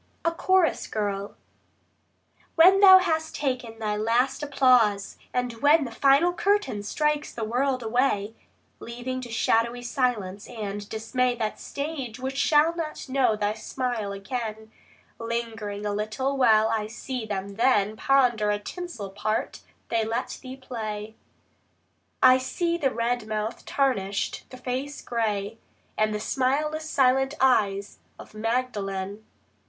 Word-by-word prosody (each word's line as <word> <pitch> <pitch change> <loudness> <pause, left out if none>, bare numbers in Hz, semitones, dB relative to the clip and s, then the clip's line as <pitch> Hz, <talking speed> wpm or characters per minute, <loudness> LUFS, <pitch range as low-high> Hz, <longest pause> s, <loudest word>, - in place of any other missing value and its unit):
A 335 - +3
CHORUS 365 0 +2
GIRL 200 -2 -3 1.2
When 370 +4 +7
thou 380 -2 +10
hast 320 -4 -1
taken 250 -5 -3
thy 215 -2 -2
last 240 +6 +1
applause, 250 -8 +3 0.2
and 250 -1 -1
when 295 +2 +5
The 245 - -6
final 280 +8 +4
curtain 405 - 0
strikes 300 +8 -1
the 230 - -5
world 255 +3 0
away, 225 -3 0 0.5
Leaving 245 +2 -5
to 245 - -8
shadowy 235 +1 +1
silence 235 -7 -2
and 205 -3 -6
dismay 245 +3 0
That 220 -3 -3
stage 280 -5 -5
which 265 +1 -4
shall 305 +4 +3
not 310 -4 -5
know 260 -4 +2
thy 210 0 -1
smile 220 -1 -3
again, 220 +2 -5 0.5
Lingering 225 -3 -4
a 205 - -1
little 215 +7 -2
while 220 -4 +4
I 220 -2 -1
see 230 +1 -5
thee 205 -2 -1
then 215 -2 +2
Ponder 240 -5 +2
the 205 - +1
tinsel 225 - -7
part 215 +2 -2 0.3
they 230 -1 +1
let 230 +3 -3
thee 260 0 -8
play; 220 -4 -6 1.1
I 255 0 +7
see 335 +6 -1
the 290 -6 +1
red 235 -2 -1
mouth 215 +1 -3
tarnished, 205 -8 -1
the 255 - -10
face 260 +3 -4
grey, 220 -2 -2 0.4
And 215 0 +1
smileless 300 +7 -1
silent 270 +1 +2
eyes 205 -6 +2 0.2
of - - -13
Magdalen. 215 -3 -2
240 Hz, 130 wpm, -26 LUFS, 215-270 Hz, 1.2 s, thou